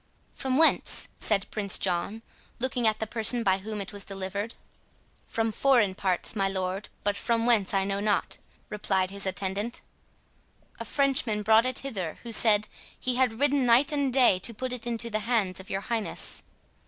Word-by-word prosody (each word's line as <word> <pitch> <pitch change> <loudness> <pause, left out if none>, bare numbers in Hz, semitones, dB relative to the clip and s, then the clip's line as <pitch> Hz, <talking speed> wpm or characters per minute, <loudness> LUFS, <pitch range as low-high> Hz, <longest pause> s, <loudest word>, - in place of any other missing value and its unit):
"From 260 -1 -2
whence?" 320 +1 +2
said 200 -3 +2
Prince 200 -3 +1
John, 195 +5 -1 0.3
looking 245 -2 0
at 215 -1 +1
the 220 - -3
person 230 +2 +2
by 190 -2 +2
whom 210 +2 -6
it 195 0 -5
was 200 -1 -5
delivered. 195 +3 -5 0.7
"From 225 0 -1
foreign 235 -5 +3
parts, 185 +1 -1
my 195 -2 +1
lord, 190 +1 -3
but 205 0 0
from 230 +1 0
whence 225 -6 +3
I 195 -1 +1
know 195 0 -1
not" 205 0 0 0.3
replied 195 -3 -1
his 200 0 -4
attendant. 195 +4 -3 1.0
"A - - -5
Frenchman 260 -7 0
brought 220 +3 +5
it 255 - +1
hither, 190 - -4
who 235 - -7
said, 215 -1 +5 0.3
he 250 -1 0
had 250 -3 +1
ridden 285 -1 +3
night 250 +6 +5
and 285 -3 0
day 250 -8 +4
to 230 +4 -4
put 255 +3 -4
it 240 -1 -4
into 235 0 -3
the 215 - 0
hands 210 -5 0
of 190 - -11
your 195 - -2
highness." 225 0 -3
215 Hz, 180 wpm, -27 LUFS, 195-240 Hz, 1.0 s, brought